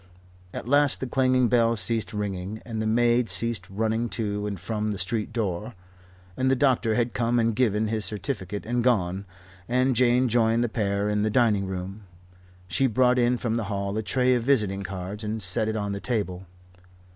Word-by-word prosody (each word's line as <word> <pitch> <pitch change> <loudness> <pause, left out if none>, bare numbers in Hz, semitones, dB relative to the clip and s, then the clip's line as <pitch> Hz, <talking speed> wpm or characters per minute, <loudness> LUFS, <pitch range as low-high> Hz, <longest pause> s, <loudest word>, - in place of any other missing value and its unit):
At - - -7
last 145 +1 +3
the - - -3
clanging 130 -1 +2
bell 115 -1 +3
ceased 110 -1 -1
ringing, 100 0 -4
and 110 -2 -4
the 110 - -1
maid 120 +1 +2
ceased 115 -6 -1
running 110 +3 -1
to 105 -3 -2
and 100 -3 -4
from 105 +4 -2
the 105 - -3
street 105 +5 0
door, 105 -1 -3 0.6
and 130 +5 +1
the 135 - +4
doctor 125 -4 +2
had 120 -1 0
come 120 0 +1
and 115 -1 +1
given 110 -3 +2
his 110 0 -1
certificate 100 0 -4
and 120 +1 0
gone, 100 -5 +1 0.4
and 130 +1 +2
Jane 125 +1 +3
joined 115 0 +2
the 120 - -1
pair 100 -2 -1
in 105 0 0
the 110 - +1
dining 105 -4 +2
room. 95 +2 -6 0.6
She 95 +10 +1
brought 125 +1 +3
in 125 +1 +2
from 115 -1 -1
the 115 - -2
hall 100 0 -3
a 110 - 0
tray 125 +3 +2
of 125 - +1
visiting 105 -7 +1
cards 95 +2 -6
and 110 +1 -3
set 105 +3 0
it 110 - -1
on 100 -2 -2
the 100 0 -4
table. 95 -6 -3
110 Hz, 190 wpm, -25 LUFS, 100-120 Hz, 0.6 s, the